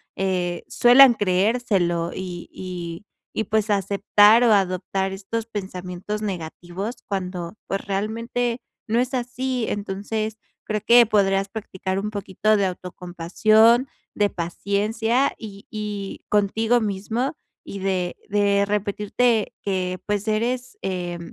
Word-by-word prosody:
eh, 180 -2 -1
suelen 250 +1 +7
creérselo. 190 -4 +1
Y 180 -2 -6
y 175 0 -7 0.3
y 220 - 0
pues, 215 0 0
aceptar, 205 +3 +4
o 230 - +5
adoptar 190 0 0
estos 210 +4 -4
pensamientos 190 -1 -5
negativos 180 +3 -5
cuando, 180 -3 -4
pues, 195 - -2
realmente 230 +4 -2 0.3
no 230 +2 +2
es 255 +2 -1
así. 250 -1 -2
Entonces, 210 +2 -3 0.3
creo 215 -1 -2
que 240 0 +8
podrías 195 -2 +2
practicar 190 -3 -4
un 210 +1 -3
poquito 205 +1 +1
de 200 - +2
autocompasión, 185 +7 +2 0.3
de 205 -1 +2
paciencia 215 +8 0
y 200 -3 -10
y 210 -2 -5
contigo 220 +4 +2
mismo 220 +7 -2 0.3
y 200 - -7
de 185 -2 -1
de 200 -1 +3
repetirte 210 +3 0
que, 185 -2 -2
pues, 205 0 -1
eres, 245 - -1
eh, 175 -2 -3
205 Hz, 120 wpm, -23 LUFS, 190-225 Hz, 0.3 s, que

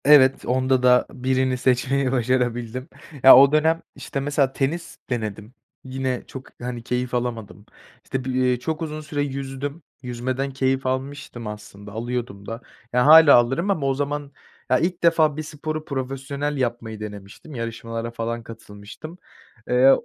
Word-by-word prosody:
Evet, 135 -2 +6
onda 130 0 +1
da 125 0 +5
birini 130 0 0
seçmeyi 130 +1 +1
başarabildim. 125 -1 -1 0.3
Ya, 130 - +11
o 140 +1 +7
dönem, 160 +2 +3
işte, 140 - -5
mesela 140 -1 +1
tenis 155 +6 -2
denedim. 110 -2 -4 0.3
Yine 130 -1 -3
çok, 130 -1 -9
hani, 120 -1 -5
keyif 125 +1 -2
alamadım, 115 -4 -4 0.4
işte, 130 -1 -4
bi - - -3 0.2
ııı, 125 -1 +1
çok 160 +4 -3
uzun 155 -1 -4
süre 150 -1 -3
yüzdüm. 140 +2 -4 0.2
Yüzmeden 130 +2 -3
keyif 135 0 0
almıştım 130 -3 -4
aslında, 105 -1 -9
alıyordum 115 -2 -4
da. 115 +3 -6 0.3
Ya, 125 +1 +3
hâlâ 160 -1 +9
alırım 135 +10 +2
ama 155 -8 0
o 135 - +2
zaman, 145 +1 -3 0.4
ya, 130 0 +4
ilk 175 +1 -1
defa 160 -3 +4
bir 155 - -3
sporu 155 +1 -5
profesyonel 140 +2 -3
yapmayı 120 -4 -3
denemiştim. 105 +7 -9
Yarışmalara 115 0 -4
falan 115 0 -4
katılmıştım. 115 - -11 0.5
Eee, 125 +2 +6
130 Hz, 145 wpm, -23 LUFS, 120-140 Hz, 0.5 s, Ya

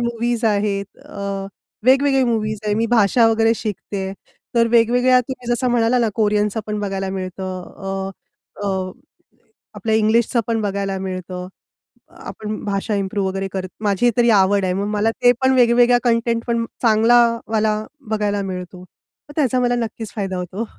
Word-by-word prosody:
Movies 235 0 -1
आहेत 200 -2 -1
अ, 200 -1 -5 0.4
वेगवेगळे 270 +1 +4
movies 215 -3 -1
आहे 210 - +1
मी 225 +2 +1
भाषा 225 0 +4
वगैरे 225 0 +3
शिकते. 200 -3 -4 0.4
तर 230 -1 +4
वेगवेगळ्या 245 +2 +4
तुम्ही 250 -1 -7
जसं 245 +1 0
म्हणाला 235 +1 +2
ना, 235 -2 +2
कोरियनच 210 -1 +1
पण 210 -1 -3
बघायला 195 -1 -3
मिळतं 185 -1 -5
अ, 195 +1 -5 0.6
अ, 190 -1 -2 0.8
आपल्या 220 -2 -1
इंग्लिशच 220 +3 +2
पण 230 -1 0
बघायला 195 -1 -2
मिळतं. 185 -1 -5 0.7
आपण 215 0 -6
भाषा 200 +1 -2
इम्प्रूव्ह 195 0 -1
वगैरे 195 0 -3
करत 185 -1 -4
माझी 210 +3 +2
तरी 240 -1 +4
आवड 200 -1 +4
आहे. 185 - 0
मग 200 +2 -1
मला 215 +2 +2
ते 245 +2 +3
पण 260 - +4
वेगवेगळ्या 245 0 +5
कंटेंट 230 -1 +1
पण 235 -1 0 0.2
चांगलावाला 225 -1 +3 0.3
बघायला 205 -2 0
मिळतो. 180 0 -7
मग 185 +9 -19
त्याचा 260 -5 +2
मला 245 0 +2
नक्कीच 225 -2 -4
फायदा 195 -3 -2
होतो. 185 +5 -4
215 Hz, 150 wpm, -20 LUFS, 195-235 Hz, 0.8 s, वेगवेगळ्या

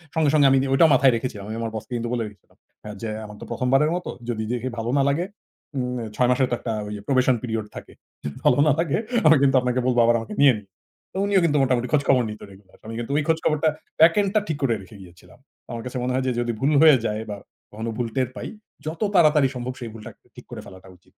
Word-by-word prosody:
সঙ্গে, 160 -2 +3
সঙ্গে, 145 -2 +5
আমি 135 - +5 0.2
ঐটাও 160 +3 +5
মাথায় 130 0 +5
রেখেছিলাম। 110 -4 -5
আমি 110 - -4
আমার 115 -1 -3
বসকে 110 +3 -7 0.2
বলে 120 -2 -1
রেখেছিলাম। 105 -1 -18 0.3
হ্যাঁ, 105 -1 -8
যে, 115 - -3 0.2
আমার 105 0 -11
তো - - -7
১ম 125 - -2
বারের 150 +4 +4
মতো 180 - -5 0.2
যদি 110 -2 -2
দেখে 125 +1 -2
ভালো 115 +1 -3
না - - +4
লাগে, 165 +6 0 0.5
উম 125 0 -2 0.2
৬ 125 -1 +2
মাসের 130 0 +2
তো - - +2
একটা 115 - -3 0.3
probation 130 -1 +3
period 110 -3 -3
থাকে। - - -10 0.3
যদি 70 -1 -6
ভালো 125 - +5
না - - +5
লাগে 165 -4 +1 0.3
আমি 155 -1 +7
কিন্তু 135 -1 +3
আপনাকে 125 0 0
বলব 125 - +1
আবার 120 0 +4
আমাকে 115 - -8
নিয়েন 130 -7 +5 0.5
তো - - -6
উনিও 200 -2 +3
কিন্তু 150 -2 +2
মোটামুটি 125 -2 +1
খোঁজখবর 135 -4 +3
নিত 105 - -10
রেগুলার। 95 0 -19
আমি 115 - -6
কিন্তু 120 +3 -5
ওই 155 - +1
খোঁজ 160 -1 +3
খবরটা 155 +1 +2 0.3
প্যাকেলটা 190 +5 +4
টা - - +6
ঠিক 155 -3 -2
করে 120 -4 +2
রেখে 105 +3 -14
গিয়েছিলাম। 90 -1 -17 0.3
আমার 115 -1 -5
কাছে 125 0 -5
মনে 125 0 -1
হয় 130 0 0
যে, 130 - +2
যদি 120 0 -1
ভুল 140 +3 +1
হয়ে 155 -4 +8
যায় 105 0 -2
বা 100 - -5 0.3
কখনো 110 +2 -5
ভুল 120 -2 -1
টের 130 -2 0
পাই, - - -6 0.4
যত 160 +4 -5
তাড়াতাড়ি 150 -4 +5
সম্ভব 125 +1 -4
সেই 120 - -6
ভুলটা 115 +1 -10 0.2
ঠিক - - -13
করে - - -7
ফেলাটা 95 0 -13
উচিত। 90 - -38
125 Hz, 235 wpm, -23 LUFS, 115-145 Hz, 0.5 s, হয়ে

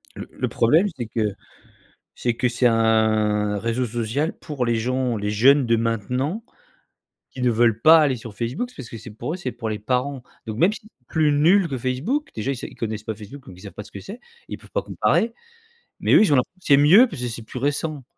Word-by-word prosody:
Le - - -8
le - - -3
problème, 155 - +3
c'est 120 - -5
que 110 -3 -1 0.8
c'est 120 -1 -1
que 125 +1 0
c'est 125 +1 +1
un 110 -2 +2
réseau 115 +4 -1
social 120 +6 -2
pour 140 -5 -4
les 115 -1 +1
gens 125 +1 -1
les 105 0 -2
jeunes 130 +6 +4
de 115 0 +3
maintenant 125 - -2 0.9
qui 130 - -9
ne 125 - +3
veulent 115 -1 +2
pas 160 +6 +8
aller 145 -4 +2
sur 115 -3 -10
Facebook 125 - -3
parce 135 -5 -8
que - - -8
c'est 115 - -11
pour 150 +10 -5
c'est 175 -8 -4
pour 115 -2 -5
les 105 -1 -3
parents. 125 +4 -2 0.2
Donc, 110 0 -5
même 180 +8 +4
si 215 - -7
c'est 135 - -23
plus 155 -2 +2
nul 170 +7 +4
que 135 - -3
Facebook, 130 - -2
déjà 115 +5 -2
ils 135 - -5
sav - - -7
ils - - -16
connaissent 110 -2 -4
pas 110 0 -4
Facebook 115 +6 -11
donc 90 - -12
ils - - -14
savent 100 - -9
pas 105 - -8
ce - - -16
que - - -9
c'est. 210 - -10 0.3
Ils - - -6
peuvent - - -18
pas - - -1
comparer. 230 +1 0 0.7
Mais - - +1
eux, - - +8
ils 200 -9 +4
ont - - +5
l'impression 180 +9 -2
c'est 140 - +6
mieux 175 - +7
parce 160 - -8
que 125 - -2
c'est 115 -1 -6
plus 125 - -8
récent. 145 +1 -2
125 Hz, 235 wpm, -22 LUFS, 110-145 Hz, 0.9 s, pas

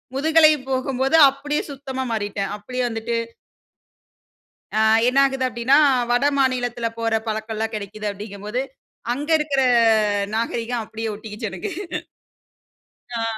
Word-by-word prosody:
முதுகலை 310 +2 +5 0.2
போகும்போது 265 +2 0
அப்பிடியே 290 +2 -3
சுத்தமா 265 -1 -5
மாறிட்டேன். 205 -2 -3
அப்பிடியே 250 +5 -4
வந்துட்டு 225 +1 -3 1.6
ஆ - - +3 0.3
என்ன 255 +2 +2
ஆகிது 270 -1 -2
அப்பிடின்னா, 240 +3 +2 0.3
வட 245 +2 +2
மாநிலத்தில 245 -3 0
போற 225 -1 +1
பழக்கல்லாம் 220 +1 -3
கிடைக்கிது 210 0 -5
அப்பிடிங்கம்போது 205 +3 -5 0.5
அங்க 290 +5 -4
இருக்கற 295 -3 0 0.7
நாகரிகம் 230 +1 -2
அப்பிடியே 220 0 -5
ஒட்டிக்கிச்சு 215 +1 -6
எனக்கு. 190 -2 -5 1.5
ஆ. 230 - -1
235 Hz, 110 wpm, -22 LUFS, 220-265 Hz, 1.6 s, முதுகலை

